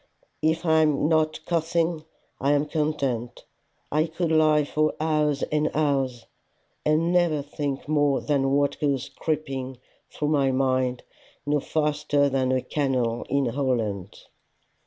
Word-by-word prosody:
If 160 +2 +1
I 160 -1 +4
am 150 -1 +2
not 155 -1 +1
coughing, 165 -1 0 0.3
I 140 +2 +2
am 145 +1 +2
content. 140 -6 -2 0.5
I 155 +2 +2
could 165 +1 -2
lie 155 -1 +4
for 155 +1 0
hours 150 -2 +1
and 150 0 0
hours 135 -5 0 0.6
and 160 +3 +2
never 170 -5 +2
think 140 -1 -4
more 145 -2 +2
than 140 -2 0
what 140 0 +1
goes 140 -3 -1
creeping 135 -5 -3 0.3
through 150 - -2
my 140 -3 +2
mind 130 -1 0 0.4
no 145 0 +1
faster 150 -1 +1
than 130 -1 0
a 130 -1 +1
canal 130 -5 -1
in 140 +1 +1
Holland. 115 -7 -2
145 Hz, 135 wpm, -25 LUFS, 135-155 Hz, 0.6 s, I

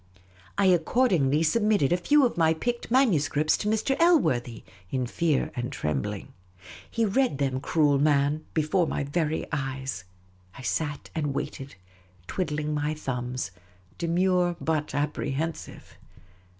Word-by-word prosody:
I 200 - +3
accordingly 170 - +3
submitted 205 -3 +2
a - - +5
few 280 +11 +4
of 240 - -1
my 160 -1 +3
picked 240 +8 -3
manuscripts 155 - +3
to 210 - -4
Mr. 220 +5 +1
Elworthy, 130 - +2 0.3
in 130 -1 -1
fear 150 +3 0
and 120 0 -3
trembling. 75 -4 -3 0.6
He 230 -1 0
read 240 - +1
them, 135 -2 0
cruel 145 -2 +2
man, 145 +1 +2
before 160 +3 +2
my 145 - -2
very 155 +2 -1
eyes; 135 -8 -3 0.5
I 135 - -9
sat 150 +3 -3
and 145 -3 -2
waited, 135 -3 -5 0.5
twiddling 150 - -2
my 150 +1 -1
thumbs, 125 -7 -4 0.5
demure 175 +1 +2
but 155 -3 -1
apprehensive. 145 +2 -3
155 Hz, 125 wpm, -27 LUFS, 140-180 Hz, 0.6 s, a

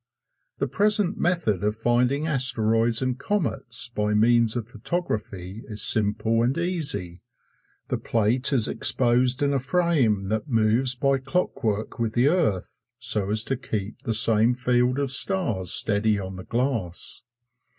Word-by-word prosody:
The - - -2
present 210 -2 +1
method 155 - -1
of 105 +1 -1
finding 125 +5 0
asteroids 120 -5 +1
and 130 -1 -3
comets 140 - 0
by 105 -2 -2
means 115 +1 +3
of 115 -3 -4
photography 110 - -5
is 105 -2 +1
simple 110 +2 +2
and 125 +5 0
easy. 150 - -1 0.7
The - - -2
plate 115 +5 0
is 125 -6 +3
exposed 125 +2 +1
in 140 0 +1
a 135 - 0
frame 135 - 0
that 110 +7 -3
moves 115 +3 +2
by 135 +1 0
clockwork 130 - -3
with 115 -2 -2
the 125 +4 +2
earth, 130 - -2 0.2
so 105 -4 0
as 110 +1 0
to 135 - -2
keep 110 -2 -6
the 115 -5 -2
same 115 +2 +3
field 125 +1 0
of 140 -2 -1
stars 135 - +2
steady 105 0 +3
on 95 -1 -7
the 95 - -10
glass. 115 -8 -2
120 Hz, 145 wpm, -24 LUFS, 110-135 Hz, 0.7 s, means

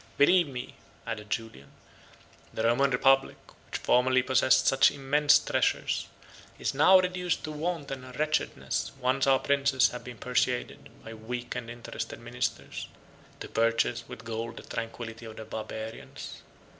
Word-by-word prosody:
Believe 170 +4 +5
me," 125 -3 -7 0.3
added 105 -1 -5
Julian, 110 - -5 0.8
"the 110 - -3
Roman 120 +4 +3
republic, 135 +1 +3 0.3
which - - -3
formerly 130 +1 +3
possessed 130 0 +4
such 135 - +6
immense 145 +2 +4
treasures, - - 0 0.5
is - - -2
now 185 +7 +7
reduced 180 -1 -1
to 155 - -4
want 155 -1 -3
and 130 -1 -6
wretchedness 155 0 -1
once 130 +1 +1
our 135 -1 +6
princes 140 -1 +3
have 125 - -8
been 125 -1 -9
persuaded, 125 +2 -1 0.2
by 115 - -7
weak 120 +2 -5
and 115 - -5
interested 120 0 -6
ministers, - - -4 0.5
to - - -5
purchase 115 0 +1
with - - -10
gold 115 0 -4
the - - -8
tranquillity 115 0 -6
of 110 - -9
the 110 - -8
Barbarians. 110 0 -7
125 Hz, 145 wpm, -28 LUFS, 115-140 Hz, 0.8 s, now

